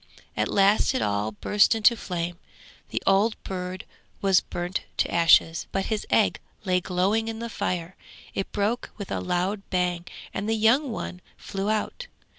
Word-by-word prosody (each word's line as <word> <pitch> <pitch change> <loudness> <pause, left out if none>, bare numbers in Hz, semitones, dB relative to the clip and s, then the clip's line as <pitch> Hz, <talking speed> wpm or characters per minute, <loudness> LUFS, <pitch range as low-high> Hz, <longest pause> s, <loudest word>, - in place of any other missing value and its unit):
At - - +1
last 200 +6 +3
it - - +1
all 105 +2 -1
burst 210 - +3
into 225 +2 +5
flame; 175 -4 -4 0.5
the - - -3
old 210 +3 +3
bird 185 0 -5 0.3
was 195 -2 +4
burnt 175 +1 -3 0.2
to - - +1
ashes, 165 -1 +4
but 195 - -1
his 210 - -3
egg - - +3 0.3
lay 180 -1 +2
glowing 195 +5 +1
in 225 0 -4
the 235 +1 -5
fire; 180 -2 -3 0.4
it 195 - -3
broke 215 +4 -1
with 200 -3 -7
a - - -1
loud 180 +3 -1
bang 180 -2 0 0.3
and 205 +2 -3
the 225 - +2
young 235 +6 +3
one 180 -4 -5 0.2
flew 195 +1 -3
out. 220 - -2
195 Hz, 165 wpm, -26 LUFS, 180-215 Hz, 0.5 s, into